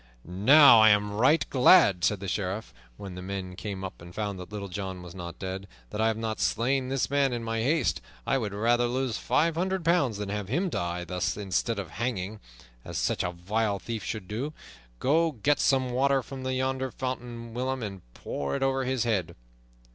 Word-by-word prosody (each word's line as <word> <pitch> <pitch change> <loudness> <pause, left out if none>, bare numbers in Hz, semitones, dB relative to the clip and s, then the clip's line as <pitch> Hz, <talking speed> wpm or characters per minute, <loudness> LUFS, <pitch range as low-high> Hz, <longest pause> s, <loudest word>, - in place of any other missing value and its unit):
"Now, 115 - +7
I 110 - +8
am 105 0 +3
right 130 +10 +3
glad," 125 - +6
said 105 -3 +1
the 100 - -5
Sheriff, 100 - -3 0.2
when 95 -2 -8
the 90 - -7
men 95 -1 -5
came 95 0 -5
up 95 - -7
and 85 +1 -12
found 100 -3 -3
that 90 +1 -9
Little 100 -1 -5
John 95 -1 -5
was 85 -1 -10
not 85 -2 -7
dead, 95 +1 -5 0.2
"that 105 - -2
I 110 - +4
have 110 -1 0
not 110 -1 -3
slain 130 +3 +1
this 135 -1 0
man 140 -2 +3
in 120 -1 -3
my 115 0 -2
haste! 150 +7 +1 0.2
I 135 - +1
would 105 -4 -3
rather 120 +4 +2
lose 125 -1 -1
five 165 +1 +2
hundred 185 +1 -1
pounds 165 - +2
than 105 -1 -4
have 105 -1 -3
him 175 - 0
die 85 - -2
thus 90 +1 -2
instead 100 +3 -1
of 95 -6 -5
hanging, 110 -2 -3 0.4
as - - -6
such - - 0
a 90 - -1
vile 100 +4 -1
thief 110 +1 -5
should 100 0 -5
do. 125 +10 -4 0.4
Go, 160 - +2
get 145 +4 +1
some 130 -2 +2
water 135 +1 +2
from 130 0 -8
yonder 130 0 -1
fountain, 120 -2 -5
William, 130 +1 -2
and 100 -3 -6
pour 70 -1 -3
it - - -1
over 135 -1 +1
his 130 -2 0
head." 105 -8 -1
110 Hz, 200 wpm, -28 LUFS, 95-130 Hz, 0.4 s, I